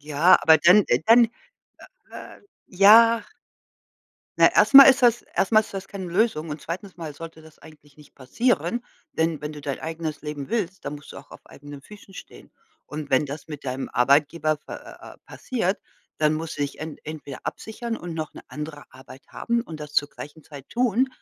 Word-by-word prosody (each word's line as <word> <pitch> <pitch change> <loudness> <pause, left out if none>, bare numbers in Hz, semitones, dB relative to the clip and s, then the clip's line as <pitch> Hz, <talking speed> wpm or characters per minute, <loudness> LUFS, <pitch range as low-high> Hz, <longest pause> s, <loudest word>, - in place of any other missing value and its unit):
Ja, 150 +4 +4
aber 160 0 +6
dann 180 +6 +5
äh, - - +2
dann 235 +1 +7 0.9
äh, - - -11
äh, - - -25 0.3
ja 225 +4 +6 1.2
ne, - - +5
erstmal 275 0 +9
ist 265 0 +4
das 240 -1 +3
erstmal 215 +2 +3
ist 210 - -14
das 195 0 -6
keine 195 -2 -7
Lösung 175 -3 -1
und 150 +1 -6
zweitens 185 +3 -7
Mal 160 -4 -7
sollte 160 +1 -11
das 160 -1 -18
eigentlich 150 -2 -18
nicht 150 -2 -19
passieren, 240 - -1 0.3
denn, 160 -2 -1
wenn 150 +1 -6
du 150 - -10
dein 140 -1 -5
eigenes 160 -2 -5
Leben 150 -1 -6
willst, 195 -5 -3
dann 145 - -5
musst 145 -1 -13
du - - -11
auch - - -16
auf - - -14
eigenen 145 0 -12
Füßen 205 +2 -15
stehen. - - -13 0.3
Und 150 -1 -8
wenn 135 +2 +2
das 145 +3 -9
mit 150 -2 -9
deinem 130 0 -4
Arbeitgeber 150 +5 +2
pa 150 - -11
ah, - - -13
ah, - - -13
ah, - - -21
passiert, 215 -6 -3 0.4
dann 155 0 +2
musst 160 0 -6
du 145 - -2
dich 140 - -5
en 155 -1 -7
entweder 150 -4 -9
absichern 230 +1 -6
und 175 -4 -8
noch 155 -1 -5
'ne - - -12
andere 150 0 -8
Arbeit 130 0 -15
haben 235 0 -2
und 160 -8 -10
das 150 0 -9
zur 145 0 +1
gleichen 150 +2 -12
Zeit 140 -3 -13
tun. 245 +1 +1
160 Hz, 200 wpm, -23 LUFS, 150-205 Hz, 1.2 s, erstmal